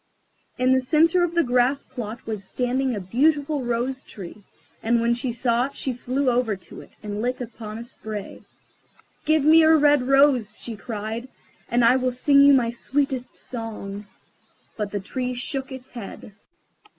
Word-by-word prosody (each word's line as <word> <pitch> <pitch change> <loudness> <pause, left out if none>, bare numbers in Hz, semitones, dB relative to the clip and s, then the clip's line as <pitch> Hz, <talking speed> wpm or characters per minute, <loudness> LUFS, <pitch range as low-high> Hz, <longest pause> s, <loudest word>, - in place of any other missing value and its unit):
In 255 +1 +2
the 260 - +5
centre 325 +7 +3
of 340 -1 -1
the 340 - +4
grass 250 +2 +2
plot 235 -3 -7
was 215 -3 -4
standing 250 +4 -1
a - - -3
beautiful 285 - +1
Rose 245 +3 -2
tree, 200 -2 -11 0.4
and 235 +1 +2
when 235 +1 +2
she 245 +1 -2
saw 240 +1 +1
it 280 - -15
she 260 - -2
flew 255 +3 -2
over 240 -3 +1
to 190 - -12
it, - - -15
and 210 0 -4
lit 250 +2 -1
upon 220 -3 -7
a 230 - -6
spray. 215 -4 -8 0.8
"Give 310 -1 +3
me 320 +1 +7
a 320 0 +6
red 290 -2 +4
rose," 270 -6 +3
she 230 - -6
cried, 220 +3 -5 0.4
"and 240 0 +3
I 245 +3 +6
will 255 0 +1
sing 280 +3 +4
you 280 0 +8
my 245 -4 +3
sweetest 265 +1 -2
song." 210 -4 -7 0.7
But 210 -2 -3
the 205 - -3
Tree 250 +5 -4
shook 265 +2 -4
its 260 -1 -9
head. 215 -2 -9
250 Hz, 175 wpm, -24 LUFS, 225-270 Hz, 0.8 s, you